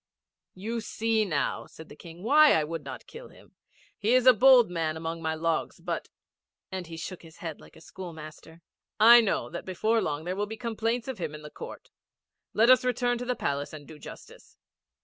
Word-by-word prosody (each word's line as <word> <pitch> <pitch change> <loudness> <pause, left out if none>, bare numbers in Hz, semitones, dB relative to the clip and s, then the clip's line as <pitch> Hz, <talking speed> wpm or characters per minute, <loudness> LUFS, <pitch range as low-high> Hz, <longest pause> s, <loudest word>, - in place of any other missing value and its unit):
'You 225 +5 -4
see 220 0 0
now,' 155 -7 -2
said 160 - -13
the - - -13
King, 170 +3 -12
'why 300 +6 +6
I 155 - +3
would 160 0 -5
not 135 -1 -8
kill 475 +2 -11
him. - - -19 0.5
He 225 +4 +2
is 255 -1 +3
a 255 - +9
bold 245 -2 +6
man 160 -2 -2
among 165 +1 -5
my 160 0 -1
logs, 165 0 -2
but,' - - -4 0.6
and 185 -2 -5
he 165 0 -8
shook 180 +2 -7
his 160 -1 -15
head 165 -3 -7
like - - -17
a 160 - -15
schoolmaster, 160 -2 -10 0.4
'I 235 +2 +9
know 220 - -1
that - - -6
before 220 +5 0
long 150 0 -3
there 180 +2 -3
will 205 +1 -2
be 220 +1 -7
complaints 230 +1 -2
of 260 -6 -5
him 155 -3 -4
in 150 - -11
the 150 - -10
court. - - -10 0.6
Let 230 +3 +5
us 255 -2 +6
return 245 -1 0
to 245 - -4
the 250 0 -1
Palace 145 -5 -3
and 145 -2 -10
do 155 -1 -12
justice.' - - -13
185 Hz, 205 wpm, -28 LUFS, 160-230 Hz, 0.6 s, a